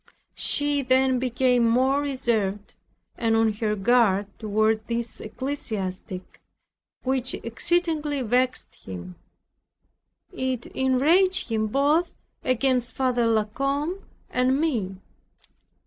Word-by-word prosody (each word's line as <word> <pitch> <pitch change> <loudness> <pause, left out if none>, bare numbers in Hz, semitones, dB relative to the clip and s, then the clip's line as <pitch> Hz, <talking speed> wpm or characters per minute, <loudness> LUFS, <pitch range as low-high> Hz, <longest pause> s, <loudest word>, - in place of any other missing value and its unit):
She 290 -1 +1
then 260 0 +2
became 250 -1 +2
more 260 +5 +3
reserved, 225 -8 -1 0.5
and 225 -1 +2
on 225 -1 +3
her 210 0 -1
guard, 205 -2 +3
toward 215 +1 +1
this 235 -1 -3
ecclesiastic, 215 -7 -5 0.6
which 260 -1 +1
exceedingly 300 +2 0
vexed 250 +2 0
him. 90 -1 -8 1.2
It 260 -2 -2
enraged 315 +8 +2
him 220 -1 0
both 290 +9 +1 0.3
against 255 -1 +1
Father 250 -3 +1
La 220 -1 +3
Combe 280 - -2 0.3
and 255 +2 +2
me. 230 - -1
250 Hz, 100 wpm, -25 LUFS, 220-275 Hz, 1.2 s, more